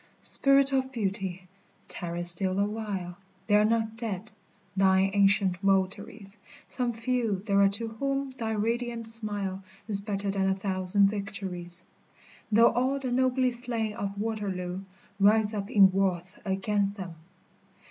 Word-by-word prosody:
Spirit 275 0 +3
of 260 0 0
Beauty! 195 -5 -4 0.4
tarry 175 -1 -5
still 185 +2 +4
a 200 - +2
while, 200 -4 -5 0.3
They 205 - -1
are 210 0 +5
not 225 0 0
dead, 220 -3 -5 0.4
thine 190 0 +3
ancient 195 -2 +2
votaries, 195 +2 -2 0.3
Some 250 -2 -1
few 230 -4 -2
there 200 -2 +2
are 200 - +5
to 225 +3 +5
whom 275 +4 -3
thy 225 -4 -4
radiant 230 +2 -2
smile 205 -4 0 0.2
Is 200 -2 +3
better 200 -1 -3
than 195 -1 0
a 190 - +1
thousand 195 0 +1
victories, 190 -4 -6 0.7
Though 230 +2 +5
all 255 +3 0
the 260 -2 -4
nobly 255 0 +1
slain 235 -3 -2
of 200 -1 -5
Waterloo 195 -4 -4 0.4
Rise 210 +2 +3
up 205 -1 -4
in 195 -2 +6
wrath 185 -1 -1
against 200 +1 -1
them 185 -4 -7
205 Hz, 140 wpm, -27 LUFS, 190-230 Hz, 0.7 s, in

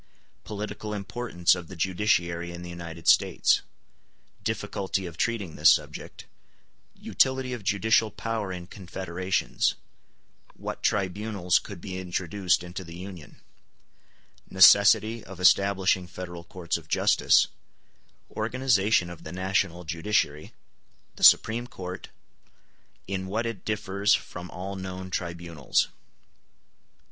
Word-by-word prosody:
] - - -40
Political 105 0 -5
importance 100 -3 +1
of 90 -2 -5
the 95 - -10
judiciary 85 -1 0
in 85 0 -8
the 85 - -7
United 85 -1 -8
States—Difficulty 95 -1 -1
of 85 -2 -7
treating 105 -5 -2
this - - +7
subject—Utility 130 -1 -3
of 120 -4 -6
judicial 110 +2 +2
power 110 -3 -3
in 90 -1 -6
confederations—What 95 0 -4
tribunals 100 -1 +1
could 100 -4 -10
be 95 0 -5
introduced 90 0 0
into 90 +2 -7
the 85 -1 -10
Union—Necessity 100 +4 +1
of 95 0 -11
establishing 95 -1 +3
federal 90 -2 -8
courts 85 -2 -3
of 80 -2 -14
justice—Organization 110 +1 0
of 85 -2 -10
the 80 - -8
national 95 -1 -1
judiciary—The 80 -2 -4
Supreme 120 +2 +6
Court—In 95 -1 -10
what 110 +5 -2
it 115 -3 -5
differs 105 -1 +1
from 90 -6 -7
all 95 +2 -6
known 95 0 -6
tribunals. 85 -4 -1
95 Hz, 100 wpm, -27 LUFS, 85-105 Hz, -, this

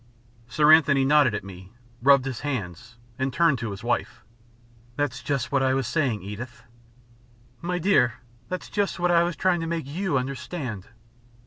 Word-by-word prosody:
Sir 150 +5 +5
Anthony 140 -4 +4
nodded 145 -5 +4
at - - -4
me, 95 +1 -12 0.3
rubbed 135 0 +5
his 130 -3 -4
hands, 115 - -5 0.2
and 130 +1 0
turned 165 -2 +2
to 115 0 -4
his 100 +2 -8
wife. 120 0 -2 0.7
"That's 140 -3 -2
just 140 -3 -2
what 140 -2 +2
I 130 0 +2
was 135 -1 -1
saying, 125 - -1
Edith." 115 +5 -8 1.0
"My 180 +1 -2
dear, 170 -9 +3 0.3
that 185 - -4
is - - -13
just 205 -1 -1
what 175 0 +2
I 170 -1 +5
was 170 -1 -1
trying 180 +2 +1
to 165 - -3
make 165 -3 -3
you 170 +2 -1
understand." 130 - -5
135 Hz, 175 wpm, -25 LUFS, 120-165 Hz, 1.0 s, Sir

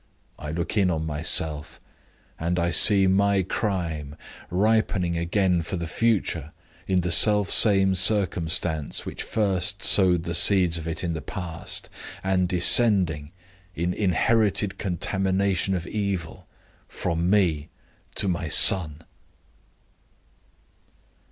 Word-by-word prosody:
I 75 - -8
look 85 +6 -5
in 95 -3 +1
on 80 -2 -3
myself, 75 0 -2 0.6
and 85 +2 -3
I 85 0 -1
see 100 +4 +5
my 100 +1 +1
crime 85 -8 -5 0.3
ripening 95 -2 -1
again 90 +1 -1
for 85 - -7
the 85 - -6
future 100 -6 -3 0.3
in 95 -1 0
the 90 0 -4
self 105 +2 +4
same 95 -3 +4
circumstance 90 -5 -1
which - - -8
first 100 -2 -2
sowed 90 -4 +4
the 85 - -6
seeds 90 -1 +2
of 80 - -9
it 80 - -5
in 85 -2 -3
the 80 - -6
past, 85 +2 -5 0.4
and 95 -2 -1
descending, 90 -5 +4 0.4
in 85 +2 -3
inherited 105 +1 -1
contamination 95 +1 -2
of 85 -2 -6
evil, 95 -6 -6 0.4
from 85 0 -4
me 85 -7 0 0.5
to 100 - 0
my 85 -3 -3
son." 80 -1 +6
90 Hz, 120 wpm, -23 LUFS, 85-100 Hz, 0.6 s, son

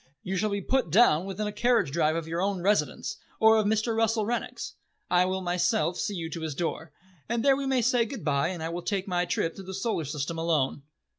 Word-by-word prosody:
You 190 - -3
shall 210 +3 +1
be 200 0 -2
put 260 -1 0
down 180 -3 +5
within 195 +2 -3
a 210 - -2
carriage 230 - +2
drive 155 +1 +2
of 165 -1 -3
your 165 +2 -2
own 195 -1 0
residence, 150 -8 0 0.2
or 220 0 +6
of 215 -1 +2
Mr. 220 +2 +1
Russell 225 -1 +1
Rennick's. 240 +2 -3 0.4
I 180 0 +5
will 190 +1 -1
myself 180 0 +1
see 205 - -2
you 165 -2 -3
to 165 - -5
his 155 -3 -4
door, 165 -1 -3 0.4
and 235 +1 0
there 275 -1 +6
we 275 0 -3
may 260 -3 +2
say 245 -1 +3
goodbye, 150 - -1
and 175 -2 -4
I 165 - -2
will 175 +1 -4
take 195 +1 -2
my 180 -1 0
trip 165 -1 -1
through 195 - -9
the 190 0 -6
Solar 195 -5 -1
System 150 +3 -3
alone." 155 -4 0
190 Hz, 230 wpm, -27 LUFS, 165-220 Hz, 0.4 s, or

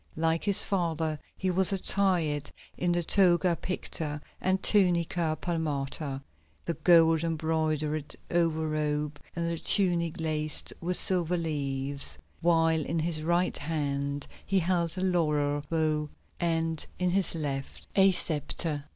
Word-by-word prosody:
Like 165 +1 0
his 200 -2 +5
father 160 -5 -1 0.2
he 190 -1 0
was 190 +2 +4
attired 180 -7 0 0.2
in 175 0 0
the 175 0 +1
toga 175 -1 +3
picta 160 -4 -4 0.2
and 190 +1 +1
tunica 175 -5 +3
palmata, 145 -4 -3 0.4
the 170 - -1
gold 165 -2 +4
embroidered 155 -2 -1 0.2
over 165 -2 +1
robe 150 -1 -2 0.2
and 170 0 -2
the 170 -1 -3
tunic 175 -5 +2
laced 155 -1 -2
with 180 +1 0
silver 180 -2 +2
leaves, 140 -3 -2 0.2
while 165 -2 +3
in 165 +4 -3
his 160 -1 -1
right 175 +3 +1
hand 145 -2 -2 0.2
he 195 - 0
held 170 -1 0
a - - -2
laurel 150 -6 +1
bough, 155 -2 0 0.3
and 165 -2 -1
in 180 0 0
his 190 -2 +1
left 140 -4 -5
a 195 0 +6
sceptre. 150 -3 +1
165 Hz, 130 wpm, -28 LUFS, 150-175 Hz, 0.4 s, a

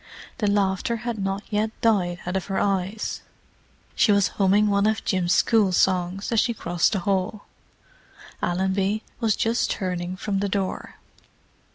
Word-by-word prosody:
The 210 - +1
laughter 200 +3 +1
had 235 -3 -2
not 195 +1 -2
yet 215 +1 +1
died 180 -6 +1
out 180 +1 -3
of 190 - -1
her 195 -1 -3
eyes; 195 +1 -1 0.7
she 215 - +3
was 200 -1 +3
humming 200 +1 +3
one 200 0 +2
of 220 -1 -1
Jim's 180 -2 0
school 215 -3 +3
songs 185 +2 +1
as 230 - +3
she 235 0 +1
crossed 175 0 0
the 195 - -1
hall. 195 +2 -1 1.0
Allenby 190 +4 0 0.2
was 225 -3 +2
just 230 +2 0
turning 180 -2 -3
from 195 0 -2
the 200 0 -1
door. 190 -1 -3
195 Hz, 155 wpm, -24 LUFS, 185-210 Hz, 1.0 s, she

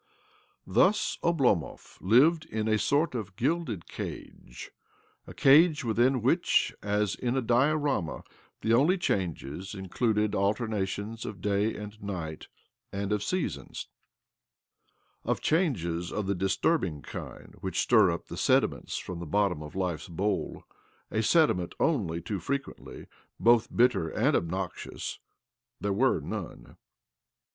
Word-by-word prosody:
Thus 210 +3 +2
Oblomov 135 - 0
lived 150 - +4
in 110 -5 -3
a 110 -1 +2
sort 150 +6 +1
of 105 -6 -5
gilde 130 - -1
cage— - - -8 0.6
a - - -9
cage 150 +2 +5
within 120 +2 +2
which, 165 +8 +2
as 105 -1 0
in 125 +1 -2
a - - +2
dioram; 130 - +1 0.4
the 115 - +2
only 150 +11 +4
changes 95 - -3
included 105 +3 0
alternation^ 105 +1 -1
оГ 100 -4 -7
da 105 +2 +1
and 105 +1 -9
night 85 -6 -5 0.4
and 100 +1 -3
of 105 - +1
the - - -5
seasons. 165 - -3 1.3
Of - - -1
change 155 - +1
^f 85 +2 -3
of 105 - -2
the 100 - 0
disturbing 95 - 0
kind - - -9
which - - -2
stir - - +5
up - - -4
th - - -7
\ - - -1
sediment - - +2
from 90 -2 -5
the 85 - -6
bottom 100 -2 +1
of 75 +2 -9
life's 90 -5 -2
bowl 95 +4 -2 0.5
i] - - -3
a^sediment 110 - +3
only 95 - 0
too 100 +1 -3
frequently 140 +10 -5 0.3
both 115 -1 +4
bitte 115 -10 +2
and - - +2
obnoxious— 90 +2 -3 0.6
there 100 -1 -1
were 130 +7 +2
none - - -7
105 Hz, 135 wpm, -28 LUFS, 95-130 Hz, 1.3 s, cage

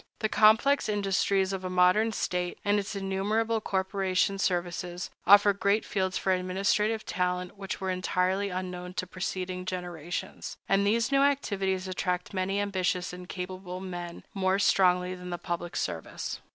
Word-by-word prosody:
The 220 - -1
complex 220 +6 +4
industries 195 -1 +1
of 190 -1 -4
a 185 - -3
modern 185 +5 +4
state, 180 -4 -2
and 205 0 +3
its 205 +1 -5
innumerable 210 +4 0
corporation 190 0 0
services, 175 -1 -2 0.2
offer 205 0 +8
great 200 +2 +1
fields 190 -2 -1
for 190 - 0
administrative 195 +4 0
talent 180 0 -2
which 195 -2 -5
were 190 -1 -1
entirely 185 +2 0
unknown 180 -1 -5
to - - -1
preceding 185 0 -4
generations; 180 -1 -5
and 200 +1 +3
these 230 +5 +2
new 275 0 +4
activities 195 -9 +1
attract 180 0 -2
many 195 +1 0
ambitious 185 -3 -1
and 180 0 -9
capable 185 0 -5
men 175 -2 -6
more 190 -1 +1
strongly 180 -2 +3
than 180 0 -8
the 175 - -3
public 175 0 -4
service. 80 -1 -4
190 Hz, 150 wpm, -28 LUFS, 180-200 Hz, 0.2 s, offer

